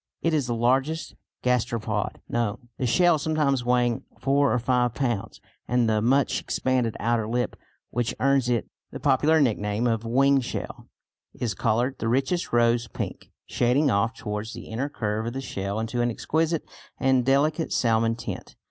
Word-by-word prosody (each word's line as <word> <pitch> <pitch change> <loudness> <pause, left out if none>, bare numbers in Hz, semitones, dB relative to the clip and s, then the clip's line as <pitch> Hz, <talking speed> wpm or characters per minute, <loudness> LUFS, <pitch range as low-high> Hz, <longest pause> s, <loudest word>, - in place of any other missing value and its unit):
It 165 - +2
is 145 -5 +1
the 120 - -1
largest 135 +7 +1 0.3
gasteropod 115 -4 -1
known, 120 +1 -2
the 130 - 0
shell 175 +5 +4
sometimes 145 -4 +1
weighing 120 -1 +1 0.2
four 140 +3 +2
or - - +2
five 125 -1 +1
pounds, 120 -7 -2 0.3
and 120 -1 +2
the 110 -1 +2
much 135 +5 +2
expanded 125 -4 0
outer 115 -1 0
lip, 120 +2 -1 0.4
which 120 0 -1
earns 135 -2 +2
it 120 -3 0 0.2
the - - -7
popular 145 +3 +3
nickname 105 -4 +1
of 115 -2 +1
"wing 135 +4 +3
shell," 120 - -6 0.5
is 115 -3 -2
coloured 120 +4 0
the 115 - -2
richest 135 +9 0
rose 120 0 +3
pink, - - -6 0.2
shading 130 +4 +2
off 115 +3 +1
towards 105 0 -5
the - - -9
inner 125 +6 -2
curve 110 -3 -2
of 120 - -3
the 135 - -3
shell 100 -5 -3
into 115 +2 -2
an 120 - +2
exquisite 160 +6 -1 0.3
and 130 -1 +3
delicate 150 +5 +2
salmon 115 -1 +2
tint. - - -7
120 Hz, 165 wpm, -25 LUFS, 115-135 Hz, 0.5 s, shell